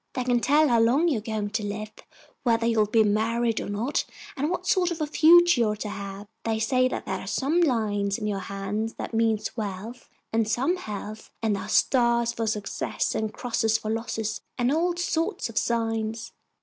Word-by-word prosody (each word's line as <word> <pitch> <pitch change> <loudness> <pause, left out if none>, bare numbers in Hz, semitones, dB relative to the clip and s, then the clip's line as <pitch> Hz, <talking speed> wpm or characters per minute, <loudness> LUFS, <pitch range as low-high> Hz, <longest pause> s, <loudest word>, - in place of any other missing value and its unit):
They 255 - -2
can 245 -1 +2
tell 295 +6 +4
how 235 -1 +4
long 255 +9 +3
you're 245 -9 0
going 210 -2 -3
to 220 0 -2
live, 210 +1 -4 0.5
whether 230 -2 +2
you'll 225 -2 +3
be 220 +1 +4
married 225 +2 +1
or - - -5
not, 225 +8 -1 0.3
and 290 +3 -1
what 360 - -3
sort 365 -2 +2
of 340 -2 -4
a 305 - 0
future 335 -1 +6
you're 210 -2 +2
to 210 0 -5
have. 200 0 -7 0.2
They 225 -1 0
say 255 +3 +2
that - - -4
there 190 - -3
are - - -9
some 280 - +1
lines 210 - +1
in 215 - -5
your 205 -2 -1
hand 200 +3 -4
that - - -6
mean 225 -1 +2 0.2
wealth, 220 +2 -6 0.2
and 225 -1 +2
some 270 +11 +1
health, 215 - -7
and 215 -2 +2
there 195 - -4
are - - -7
stars 235 -2 +3
for 225 -1 -2
success 210 -2 -2
and 220 -1 -2
crosses 225 -2 0
for 215 - -4
losses 225 -1 -3 0.2
and 245 +2 +2
all 345 +2 +1
sorts 345 - -1
of 230 - -9
signs." 225 -1 -2
225 Hz, 200 wpm, -26 LUFS, 215-255 Hz, 0.5 s, future